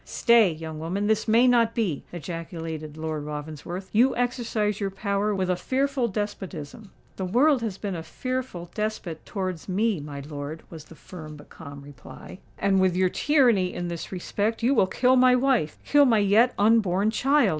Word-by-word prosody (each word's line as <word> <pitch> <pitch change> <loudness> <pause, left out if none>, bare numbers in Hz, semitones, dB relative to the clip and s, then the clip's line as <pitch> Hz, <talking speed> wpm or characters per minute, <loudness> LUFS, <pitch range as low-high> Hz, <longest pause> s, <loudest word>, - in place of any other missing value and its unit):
"Stay, 235 -6 +4
young 160 -1 -7
woman—this 200 +7 -1
may 230 +3 +5
not 235 -2 +3
be!" 195 - -1
ejaculated 165 -2 -6
Lord 155 -1 -4
Ravensworth. 155 +5 -7
"You 245 +5 +4
exercise 235 -4 -1
your 200 -2 -1
power 200 +1 -1
with 190 -1 -1
a 180 - +1
fearful 265 +4 -1
despotism." 195 -3 -6 0.3
"The 190 - -3
world 255 +8 +3
has 215 -5 -3
been 200 -2 -4
a 165 - -4
fearful 250 -4 -5
despot 210 -6 -4
towards 185 -3 -4
me, 205 0 +1
my 145 -1 -7
lord," 145 +2 -7
was 160 -3 -10
the 165 - -15
firm 155 -3 -10
but 145 - -15
calm 140 -3 -11
reply. 145 +6 -12 0.2
"And 195 -1 +2
with 185 -2 +2
your 185 0 +2
tyranny 240 -9 +2
in 175 0 -3
this 170 -1 -6
respect 205 +5 -2
you 255 +4 +3
will 190 - +3
kill 255 +6 +3
my 250 0 +6
wife—kill 265 - +2
my 235 -4 +4
yet 215 +5 +3
unborn 205 -1 +3
child!" 280 +5 +3
195 Hz, 170 wpm, -25 LUFS, 165-230 Hz, 0.3 s, my